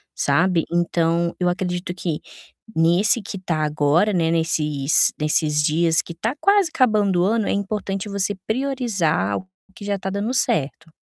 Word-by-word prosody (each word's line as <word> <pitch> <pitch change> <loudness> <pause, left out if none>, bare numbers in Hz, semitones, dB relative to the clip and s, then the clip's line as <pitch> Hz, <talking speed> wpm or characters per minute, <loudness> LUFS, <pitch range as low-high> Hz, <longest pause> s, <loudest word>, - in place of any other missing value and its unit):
sabe, 165 +4 +1
então 170 0 0
eu 180 - +1
acredito 180 0 -3
que 165 -4 -3 0.6
nesse 175 +8 +3
que 200 0 -7
está 165 -4 -2
agora, 150 +7 +2
né, 165 -2 +1
nesses 150 -3 +2
nesses 150 0 +1
dias 165 +2 +2
que - - -10
está 225 - -3
quase 400 -2 +4
acabando 210 -8 +2
o - - +2
ano 220 +1 0
é - - 0
importante 200 0 -3
você 200 0 -1
priorizar 220 - -1
o 185 - -9 0.3
que 205 -4 -10
já 200 0 -1
está 195 0 -5
dando 205 +5 -2
certo. 160 - -1
175 Hz, 160 wpm, -21 LUFS, 160-205 Hz, 0.6 s, quase